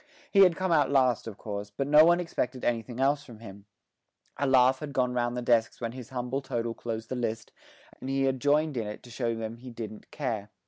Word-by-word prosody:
He 200 - +4
had 185 -3 +7
come 185 0 -1
out 145 -5 +4
last 130 -5 +2
of 105 -3 -7
course, 100 -1 -5
but 105 +7 -3
no 150 +2 +7
one 175 +2 +5
expected 130 -7 -3
anything 120 +1 -2
else 140 +2 +2
from 120 -6 -12
him; 100 -2 -12 0.7
a 140 - -1
laugh 130 0 +5
had 145 -2 -6
gone 125 -2 +1
round 120 0 -1
the 125 - -3
desks 115 -2 +2
when 115 -2 -3
his 125 -1 -9
humble 125 +1 -3
total 120 -3 -3
closed 115 -1 -5
the 130 - -3
list, 115 -3 -3 0.5
and 130 - -6
he 135 0 +1
had 130 -1 0
joined 145 0 +2
in 110 -2 -2
it 105 - -7
to 120 - -13
show 115 0 -1
them 115 0 -5
he 125 +2 -10
didn't 110 -3 -8
care. 110 -8 -3
125 Hz, 230 wpm, -28 LUFS, 115-135 Hz, 0.7 s, had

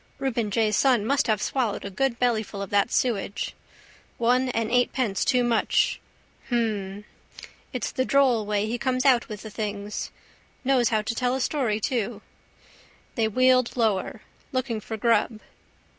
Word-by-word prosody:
Reuben 235 -5 -1
J's 215 0 +1
son 250 -6 +3
must 280 +4 +1
have 215 -3 +2
swallowed 240 -8 -1
a 200 - -5
good 255 +4 0
bellyful 220 -4 0
of 195 - -9
that 205 +3 +2
sewage. 210 -5 -1 0.6
One 250 +2 +2
and 230 -2 -1
eightpence 245 -4 +1
too 250 -1 +2
much. 235 -2 +1 0.5
Hhhhm. 210 -4 -1 0.7
It's 250 -3 -3
the 260 - 0
droll 260 -5 +3
way 210 0 0
he 235 +2 -3
comes 255 0 0
out 250 -4 +4
with 210 -2 -7
the 220 - -8
things. 205 -1 -4 0.5
Knows 255 -2 +3
how 215 -2 +1
to 230 - -2
tell 250 +2 0
a - - -2
story 250 -6 0
too. 220 -3 -2 0.9
They 225 -2 +1
wheeled 255 +2 +3
lower. 215 -5 0 0.3
Looking 255 -4 -2
for 220 +1 -6
grub. 230 0 +1
230 Hz, 155 wpm, -25 LUFS, 210-255 Hz, 0.9 s, out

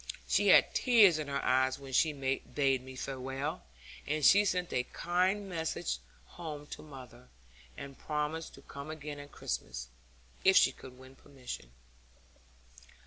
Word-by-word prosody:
She - - +2
had - - +6
tears 210 -10 +5
in 150 - -4
her 140 0 -2
eyes 130 +1 +2
when 135 -1 -10
she 155 +5 +4
bade 135 -1 -1
me 130 0 -10
farewell, 135 +2 -4 0.5
and 150 -1 0
she 205 +1 +7
sent 180 -2 -1
a 125 - +2
kind 185 +7 0
message 160 - -2 0.3
home 150 - -8
to - - -9
mother, 125 -4 -12 0.5
and 140 -1 -8
promised 150 +1 -3
to - - -15
come 140 +2 -9
again 150 -2 -6
at 145 0 -11
Christmas, - - -5 0.5
if 190 0 +6
she - - +6
could 125 -1 -13
win 130 +1 -14
permission. 130 - -9
140 Hz, 145 wpm, -32 LUFS, 130-160 Hz, 0.5 s, she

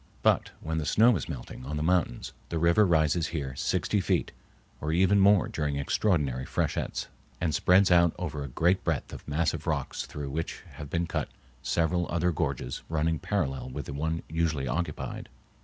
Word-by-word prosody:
But - - +3
when 80 0 -2
the 75 - -3
snow 115 +2 +5
is 85 - -4
melting 65 -3 -7
on 75 +4 -4
the 75 - -1
mountains 85 -7 0 0.2
the 85 - -2
river 85 +5 +4
rises 80 -1 +2
here 70 -5 -4
sixty 105 - 0
feet, 90 -7 0 0.5
or 75 - -2
even 95 +4 +4
more 100 0 +5
during 75 -2 -2
extraordinary 70 - +1
freshets, - - -2 0.3
and 80 -3 0
spreads 90 +4 +4
out 85 -1 +5
over 75 -5 -4
a - - -5
great 85 +8 +1
breadth - - -2
of - - -10
massive 80 +3 -1
rocks - - -2
through 70 -2 -6
which 80 +3 -4
have 70 - -8
been 85 +3 0
cut - - -2 0.3
several 85 +1 +1
other 85 +1 +1
gorges 65 -5 -2
running 80 0 0
parallel 70 -11 -2
with 70 +2 -5
the - - -6
one 80 +3 -2
usually 80 -4 -1
occupied. 85 +2 -3
80 Hz, 175 wpm, -28 LUFS, 75-90 Hz, 0.5 s, snow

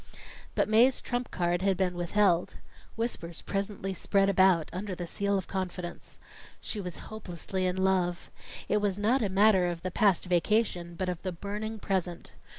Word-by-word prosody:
But - - +2
Mae's 235 +5 +5
trump 245 -1 -3
card 175 0 0
had 195 -1 +2
been 185 -1 +1
withheld. 175 0 +1 0.4
Whispers 200 -8 -4
presently 195 -1 -3
spread 195 +1 +2
about 185 -4 +4
under 190 +1 -4
the 175 - -5
seal 200 +3 0
of 190 - -3
confidence. 180 -2 -5 0.4
She 210 - -2
was 180 -3 -6
hopelessly 185 -2 -3
in 180 - -1
love. 185 -2 0 0.4
It 210 - +2
was 205 -2 0
not 230 +6 +2
a 205 - +1
matter 190 -1 +4
of 170 -1 -4
the 185 - -2
past 195 -1 +3
vacation, 180 -1 +1
but 185 +2 -2
of 180 -2 -3
the 185 - -3
burning 210 +5 -5
present. 185 -4 -2
190 Hz, 165 wpm, -29 LUFS, 175-205 Hz, 0.4 s, Mae's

